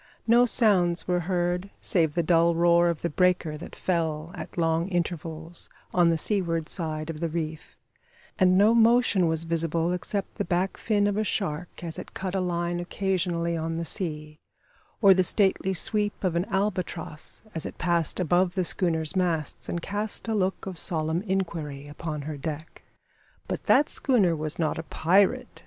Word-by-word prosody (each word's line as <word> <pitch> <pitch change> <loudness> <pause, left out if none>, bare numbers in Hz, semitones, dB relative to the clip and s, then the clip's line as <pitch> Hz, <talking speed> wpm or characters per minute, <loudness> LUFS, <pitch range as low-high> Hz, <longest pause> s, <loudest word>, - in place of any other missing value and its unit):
No 240 +2 +5
sounds 185 -7 +3
were 180 -1 +1
heard 180 +1 0
save 160 -5 +1
the 170 - +1
dull 170 0 +3
roar 170 0 +4
of 170 -3 -3
the 170 - 0
breaker 180 -1 +1
that 160 - -10
fell, 165 -3 -2
at 180 - -8
long 165 0 +1
regular 185 -2 -2
intervals, 165 -1 -4 0.2
on 175 -1 +4
the 165 - +2
seaward 165 -3 -1
side 155 -2 -3
of 150 - -9
the 170 0 -1
reef, 160 -1 -5 0.6
and 185 -1 +5
no 210 +3 +5
motion 230 -5 +4
was 160 0 +1
visible 165 +1 -1
except 195 +2 -4
the - - +2
back 180 +2 -1
fin 205 -2 +1
of 205 0 0
a 215 - +1
shark 175 -5 -3
as 165 -2 -5
it - - -10
cut 190 -1 -4
a 195 - 0
line 175 -1 -1
occasionally 175 -2 -1
on 165 0 -3
the 170 - -3
sea, 155 -4 -5 0.6
or 195 -1 +9
the 185 0 +3
stately 190 0 +2
sweep 205 +5 0
of 180 -3 0
an 170 +2 +1
albatross, 185 -6 -3
as 160 - -3
it - - -10
passed 170 -2 0
above 175 +1 +2
the 185 -2 0
schooner's 165 -2 0
masts 170 -5 -1
and 170 -1 -3
cast 205 +3 -3
a 225 - 0
look 190 -2 -1
of 185 -3 -3
solemn 160 -1 0
inquiry 165 -8 -3
upon 150 0 -5
her 150 0 -5
deck. 155 +2 -6 0.7
But - - -4
that 290 - +5
schooner 205 - +2
was 155 0 -3
not 155 -3 -1
a - - -4
pirate. 185 +5 +1
175 Hz, 180 wpm, -26 LUFS, 160-190 Hz, 0.7 s, or